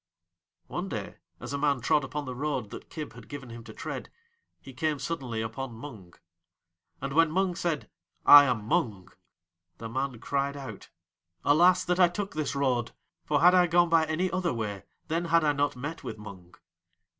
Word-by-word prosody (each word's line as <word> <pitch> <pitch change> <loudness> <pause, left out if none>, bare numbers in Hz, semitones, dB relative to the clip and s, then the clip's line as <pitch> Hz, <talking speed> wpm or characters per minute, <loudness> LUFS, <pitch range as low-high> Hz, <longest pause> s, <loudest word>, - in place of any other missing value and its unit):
One - - -4
day - - -5 0.2
as - - -6
a 140 - -2
man 140 -2 +2
trod 135 +4 +2
upon 145 +2 -4
the 130 - -5
road 130 -5 -3
that - - -9
Kib 155 -2 -7
had - - -13
given 140 -4 -8
him 115 0 -9
to - - -9
tread - - -6 0.5
he 135 - -12
came 150 +3 -1
suddenly 130 -6 -3
upon 115 +2 -5
Mung. 110 -8 -10 0.8
And 135 +1 -4
when 165 +1 +5
Mung 185 +2 +1
said: 170 -3 -2 0.4
"I 145 0 +11
am 120 -6 -1
Mung!" 110 - -1 0.7
the 115 - -7
man 130 +1 -2
cried 140 +4 -2
out: 130 -8 -9 0.6
"Alas, 175 +5 +5
that 180 +2 0
I 180 - +7
took 195 +3 -4
this 150 -2 -2
road, 125 -4 0 0.3
for 145 -1 +1
had 180 +2 +7
I 180 -1 +5
gone 175 0 +4
by 165 -1 +4
any 170 +4 0
other 180 -6 -1
way 105 -4 -4 0.2
then 165 +2 -1
had 165 0 +3
I 150 -1 +3
not 145 -1 0
met 145 +6 -6
with 115 -4 -6
Mung." 95 -4 -11
140 Hz, 185 wpm, -28 LUFS, 120-165 Hz, 0.8 s, I